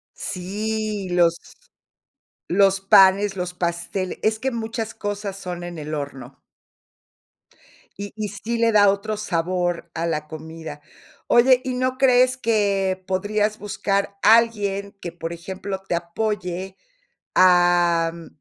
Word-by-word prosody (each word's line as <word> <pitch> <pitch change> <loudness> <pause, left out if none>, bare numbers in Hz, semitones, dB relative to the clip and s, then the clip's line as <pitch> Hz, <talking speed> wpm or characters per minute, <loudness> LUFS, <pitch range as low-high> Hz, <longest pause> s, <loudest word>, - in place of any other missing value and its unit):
Sí, 210 +1 -3
los 170 -1 +3 1.1
los 195 +1 +3
panes, 195 +1 +5
los 180 0 -3
pasteles, 175 +2 -3
es 220 0 +2
que 265 +4 -2
muchas 225 -1 -4
cosas 205 -1 -4
son 180 -2 -6
en 175 -1 -7
el 155 +1 -6
horno. 140 -3 -6 1.6
Y 200 0 -7
y 215 -2 -3
sí 220 +4 -4
le 230 0 +3
da 205 -2 +6
otro 205 +2 -1
sabor 175 -3 -2
a 170 0 -2
la 155 -2 -2
comida. 160 -1 -9 0.5
Oye, 250 +1 +5
¿y 255 -1 -3
no 255 0 -1
crees 255 -1 +4
que 200 -5 0
podrías 210 +3 0
buscar 200 -1 -2
alguien 205 -3 +3
que, 175 - -5
por 165 0 -6
ejemplo, 190 +3 -6
te - - 0
apoye 185 +1 -3 0.6
a 175 -2 +4
mm, 170 -1 -11
195 Hz, 125 wpm, -22 LUFS, 175-215 Hz, 1.6 s, da